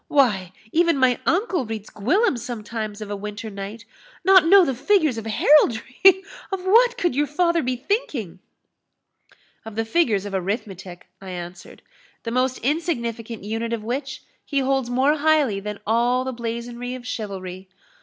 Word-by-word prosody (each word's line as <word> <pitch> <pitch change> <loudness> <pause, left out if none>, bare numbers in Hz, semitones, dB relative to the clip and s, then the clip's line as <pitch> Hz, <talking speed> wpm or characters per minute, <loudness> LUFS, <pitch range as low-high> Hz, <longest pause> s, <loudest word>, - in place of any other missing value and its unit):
Why, 205 -11 +2 0.2
even 335 -2 +3
my 255 -2 +3
uncle 365 - +1
reads 220 -1 -6
Gwillym 295 - +1
sometimes 220 -3 -5
of 210 -1 -6
a - - -2
winter 210 +2 -6
night 200 +3 -7 0.4
Not 380 -4 +6
know 385 +1 +7
the 270 - -1
figures 310 - +2
of 225 - -8
heraldry! 295 - +4 0.3
of 380 -1 -4
what 480 +5 +5
could 350 - 0
your 295 +1 +1
father 340 +3 +1
be 255 -1 -1
thinking?" 250 - -3 1.2
"Of 225 -2 -9
the 225 0 -1
figures 225 - +1
of 200 - -6
arithmetic," 190 -2 -4 0.2
I 190 - -9
answered; 175 0 -9 0.4
"the 230 - -4
most 255 +1 +1
insignificant 235 - -2
unit 225 +2 -3
of 225 -2 -3
which 265 +4 -4 0.2
he 280 - -4
holds 265 -2 0
more 265 +5 +2
highly 295 -9 +2
than 210 0 -6
all 240 +3 +2
the 260 0 -4
blazonry 235 +1 -5
of 250 -1 -10
chivalry. 190 -5 -6
240 Hz, 155 wpm, -23 LUFS, 210-295 Hz, 1.2 s, know